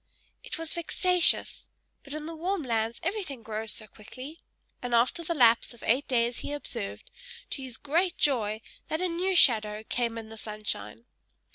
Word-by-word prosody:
It - - -4
was 325 -1 0
vexatious; 355 +1 +3 0.3
but 280 +1 -7
in 305 0 -5
the 330 - -5
warm 360 +2 -1
lands 230 -2 -1
everything 335 - -3
grows 220 0 -1
so 215 - -2
quickly; 255 +9 -11 0.4
and 245 -1 0
after 255 +9 +2
the 335 +1 -2
lapse 235 -2 +4
of 235 - -16
eight 255 +6 +2
days 240 -1 +1
he 290 - -4
observed, 260 - -5 0.4
to 275 - -2
his 255 -3 -7
great 335 +5 0
joy, 220 -6 +1 0.3
that 315 - -2
a 365 - +1
new 365 +2 0
shadow 215 -8 +5
came 230 0 -2
in 220 -1 -7
the 225 0 -9
sunshine. 160 - -4
255 Hz, 170 wpm, -28 LUFS, 225-330 Hz, 0.4 s, shadow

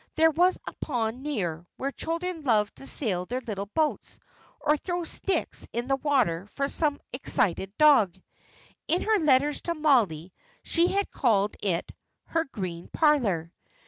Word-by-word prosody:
There 320 0 +5
was 355 +4 +3
a - - -6
pond 240 -3 -2
near, 175 - -3
where 275 +1 -2
children 335 +3 -3
loved 220 -7 +1
to 270 - -9
sail 185 -9 -1
their 250 +2 -2
little 205 -5 -5
boats, 305 +8 -1 0.4
or 300 - +3
throw 350 +3 -3
sticks 385 +3 -2
in 240 +1 -2
the 270 - +2
water 250 - +1
for 275 +6 -2
some 290 0 0
excited 195 -6 0
dog. 220 - +5 0.7
In 345 +3 +1
her 435 -1 +3
letters 290 -1 +3
to 340 - -2
Mollie, 210 - +2 0.3
she 340 +1 +2
had 400 +2 -1
called 210 -5 +1
it 180 -5 -1 0.3
"her 330 0 0
green 185 - -6
parlour." 210 - +1
265 Hz, 150 wpm, -27 LUFS, 200-310 Hz, 0.7 s, There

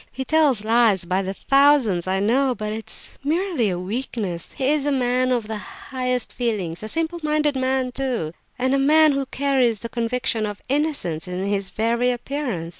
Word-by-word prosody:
He 265 +2 -5
tells 285 -9 +3
lies 220 -5 +3
by 185 +2 0
the 190 0 -4
thousands, 275 -11 +3
I 190 +1 +1
know, 250 +5 +2
but 215 -1 -4
it 220 0 -7
is - - -3
merely 320 - 0
a 180 - -2
weakness; 195 -3 -4
he 265 0 -1
is 295 -1 +1
a - - +2
man 255 -1 +1
of 240 -3 0
the 220 -1 -4
highest 250 +3 -3
feelings; 205 -9 -2
a 215 - -5
simple 330 +5 -1
minded 300 -1 +1
man 260 -1 0
too, 245 -12 -2 0.2
and 260 +1 +1
a 275 - +3
man 305 +2 +5
who 275 -1 -1
carries 265 -5 +1
the 230 +3 -7
conviction 235 -1 -1
of 205 -1 -6
innocence 275 - -1
in 180 +1 -3
his 200 -1 -1
very 230 +5 +1
appearance. 245 - -3
245 Hz, 190 wpm, -22 LUFS, 210-275 Hz, 0.2 s, man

